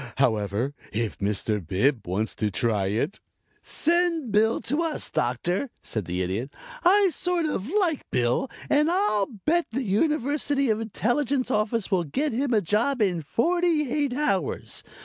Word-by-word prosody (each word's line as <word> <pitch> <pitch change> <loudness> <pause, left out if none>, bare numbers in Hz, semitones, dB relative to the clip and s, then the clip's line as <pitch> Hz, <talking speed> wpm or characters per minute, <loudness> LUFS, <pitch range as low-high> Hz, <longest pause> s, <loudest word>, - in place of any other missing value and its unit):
However, 110 0 +1 0.2
if 110 0 -2
Mr. 105 0 -1
Bib 110 - 0
wants 105 +5 -1
to 105 - 0
try 105 -2 0
it 115 - -1 0.3
" - - -38
"Send 335 -5 +1
Bill 220 +2 +3
to 290 +6 -1
us, 325 -2 -1
Doctor," 175 - -1
said 110 -5 -3
the 90 +2 -2
Idiot. 105 +10 -3 0.3
"I 390 +1 +5
sort 355 -2 0
of 250 -7 -2
like 360 -6 0
Bill 125 - +1 0.2
and 300 +2 +3
I'll 340 - +2
bet 310 - 0
the 260 +4 -2
University 280 +3 +1
Intelligence 245 +5 0
Office 215 -1 0
will 185 -3 +2
get 275 - -1
him 260 +3 0
a 220 -3 +3
job 225 - +1
in 185 -6 +1
forty 315 - +1
eight 285 -4 0
hours. 230 - -1
220 Hz, 150 wpm, -25 LUFS, -, 0.3 s, I